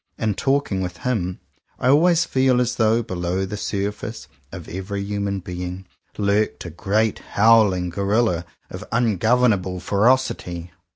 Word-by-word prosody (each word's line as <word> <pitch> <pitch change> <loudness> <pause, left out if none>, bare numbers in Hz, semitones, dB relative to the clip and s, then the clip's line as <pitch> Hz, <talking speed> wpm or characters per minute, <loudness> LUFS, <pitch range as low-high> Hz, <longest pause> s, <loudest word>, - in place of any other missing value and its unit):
In 110 -2 0
talking 135 -5 0
with 90 -2 -4
him, 95 -8 -1 0.4
I 125 - +1
always 165 +4 +4
feel 130 -1 +2
as 125 0 0
though 115 +1 +3
below 95 -3 -2
the 95 - -5
surface 105 +2 -4 0.2
of 90 -4 -9
every 95 +3 -4
human 100 -1 -2
being, 90 +1 -6 0.3
lurked 105 0 0
a 90 - -6
great 105 +5 0 0.2
howling 100 -5 +4
gorilla 100 -1 +1 0.3
of - - -7
ungovernable 110 -4 +2
ferocity. 100 -6 0
100 Hz, 130 wpm, -22 LUFS, 90-115 Hz, 0.4 s, always